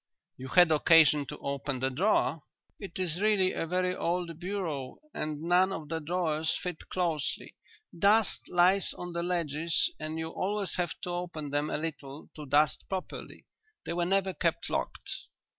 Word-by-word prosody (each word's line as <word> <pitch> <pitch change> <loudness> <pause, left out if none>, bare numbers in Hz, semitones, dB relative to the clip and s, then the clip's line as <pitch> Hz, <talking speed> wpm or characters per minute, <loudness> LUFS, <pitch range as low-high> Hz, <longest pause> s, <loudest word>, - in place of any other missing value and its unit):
"You 130 - -8
had 175 +3 +6
occasion 150 -2 +5
to - - -6
open 140 0 -3
the 130 +1 -1
drawer?" 165 +1 +2 0.4
"It 195 -4 -7
is 180 -1 -1
really 205 -3 +3
a 165 - -2
very 180 +1 0
old 170 -2 -2
bureau 175 -8 -3 0.2
and 155 0 -3
none 180 +3 +4
of 160 -5 -5
the 165 0 -2
drawers 160 -1 0
fit 180 -3 -6
closely. 165 -6 -2 0.4
Dust 200 +2 +3
lies 180 +2 +3
on 175 -1 -6
the 170 - -1
ledges 170 -2 +1
and 155 +1 -4
you 160 0 -3
always 200 +3 -2
have 175 -2 -2
to 180 - -3
open 170 -5 -4
them 145 +1 0
a - - -1
little 150 -2 -6
to 150 -2 -8
dust 145 +1 +3
properly. 190 -1 -6 0.4
They - - -2
were 175 0 0
never 195 +1 +1
kept - - -1
locked." - - -3
170 Hz, 165 wpm, -30 LUFS, 150-180 Hz, 0.4 s, had